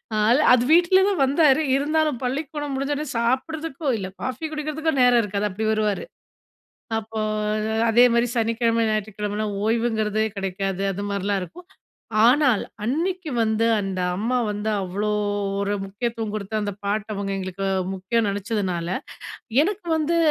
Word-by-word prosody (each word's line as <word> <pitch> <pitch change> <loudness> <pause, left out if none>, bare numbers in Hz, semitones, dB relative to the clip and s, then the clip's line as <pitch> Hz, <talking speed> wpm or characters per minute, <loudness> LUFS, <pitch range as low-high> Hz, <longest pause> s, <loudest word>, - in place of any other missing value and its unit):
ஆ - - 0 0.4
அது 245 - +4
வீட்ல 355 +2 +5
தான் 365 -8 0
வந்தாரு 285 +1 +4
இருந்தாலும் 300 -1 +1
பள்ளிக்கூடம் 290 +2 -3
முடிஞ்சடனே 285 +2 -2
சாப்றதுக்கோ, 285 +5 -2
இல்ல 190 -3 -4 0.2
காஃபி 260 +5 -3
குடிக்கிறதுக்கோ 305 +1 -2
நேரம் 245 -1 +5
இருக்காது 205 +1 -1
அப்டி 215 +4 -3
வருவாரு 215 -2 0 1.0
அப்போ 220 0 -6 0.7
அதே 240 +2 +6
மாரி 235 +1 +3
சனிக்கிழமை, 230 0 +1
ஞாயிற்றுக்கிழமைலாம் 210 0 -2
ஓய்வுங்கிறதே 220 -2 +1
கிடைக்காது. 195 0 -2
அது 200 - -5
மாரிலாம் 200 0 -1
இருக்கும். 350 - -10 0.6
ஆனால் 255 -3 +4 0.2
அன்னைக்கு 330 - -1
வந்து 220 0 +1
அந்த 195 -2 -3 0.2
அம்மா 235 +6 0
வந்து 210 +1 -2
அவ்ளோ 200 +3 -2 0.5
ஒரு 200 +1 -1
முக்கியத்துவம் 225 +2 -3
குடுத்து, 215 0 -4
அந்த 205 0 -2
பாட்ட 205 +1 -1
அவங்க 200 0 -3
எங்களுக்கு 190 +1 -4 0.3
முக்கியம்னு 205 +3 0
நெனைச்சதுனால, 195 -4 -2 0.7
எனக்கு 390 0 -3
வந்து 320 +2 +1
225 Hz, 130 wpm, -23 LUFS, 205-285 Hz, 1.0 s, அதே